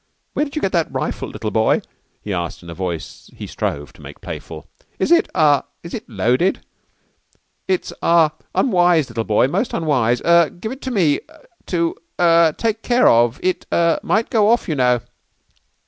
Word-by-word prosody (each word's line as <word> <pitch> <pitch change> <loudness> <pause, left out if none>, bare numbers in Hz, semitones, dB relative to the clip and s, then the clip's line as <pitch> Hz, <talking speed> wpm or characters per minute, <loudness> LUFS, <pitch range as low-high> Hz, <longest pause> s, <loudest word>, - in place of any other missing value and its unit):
"Where 295 - 0
did 285 - -10
you 305 - -3
get 190 - +1
that 170 -3 0
rifle, - - -3
little - - -5
boy?" - - +2 0.4
he 105 - -4
asked 85 -1 -4
in 85 - -9
a - - -6
voice 85 -2 -6
he - - -7
strove 75 0 -4
to - - -17
make - - -11
playful. 80 -2 -8 0.3
"Is 190 - -1
it 340 - +4
ah 145 -3 +3 0.2
is 170 - -9
it 220 - -6
loaded? 125 - 0 1.0
It's 185 -1 -1
ah 165 -2 +4 0.2
unwise, 175 - +3
little 115 -1 -3
boy. 110 +4 +3
Most 215 - -1
unwise. 125 -7 +1
Er 170 -2 +5
give 220 +6 -7
it 265 - -8
to 260 - -4
me 170 - +2 0.5
to 170 -2 0 0.3
er 170 -2 +5
take 225 -1 -1
care 245 +1 +3
of. 120 +2 +3
It 185 0 -1
er 170 -1 +2
might 220 +2 0
go 215 -2 +3
off, 235 +1 +2
you 165 - -1
know." 125 -3 +2
165 Hz, 180 wpm, -19 LUFS, 120-190 Hz, 1.0 s, Er